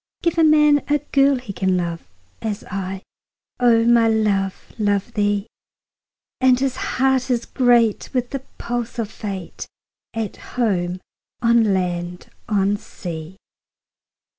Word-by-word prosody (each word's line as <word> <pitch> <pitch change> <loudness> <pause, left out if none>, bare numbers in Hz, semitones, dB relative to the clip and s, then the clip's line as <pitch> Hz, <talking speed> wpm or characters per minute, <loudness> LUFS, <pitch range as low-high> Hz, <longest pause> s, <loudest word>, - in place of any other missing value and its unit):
Give 335 -1 +1
a - - +5
man 300 -2 +5
a 295 - +3
girl 280 -1 +2
he 250 -5 -6
can 190 -1 +1
love, 170 - -3 0.3
As 215 -1 -3
I, 190 0 -4 0.6
O 230 -2 +4
my 235 -1 +5
love, 205 -4 0
love 205 +2 0
thee; 205 -1 +1 0.9
10 260 - +4
And 250 0 +4
his 265 -1 0 0.2
heart 265 -1 +2
is 240 -2 0
great 240 -4 +2
with 250 -1 -1
the 275 - -2 0.2
pulse 240 0 -4
of 225 -2 -3
Fate, 195 -5 -6 0.5
At 220 -3 -3 0.2
home, 185 -6 0 0.4
on 230 -2 +4
land, 175 -1 -3 0.2
on 200 -1 +2
sea. 170 -2 -8
220 Hz, 135 wpm, -21 LUFS, 195-250 Hz, 0.9 s, a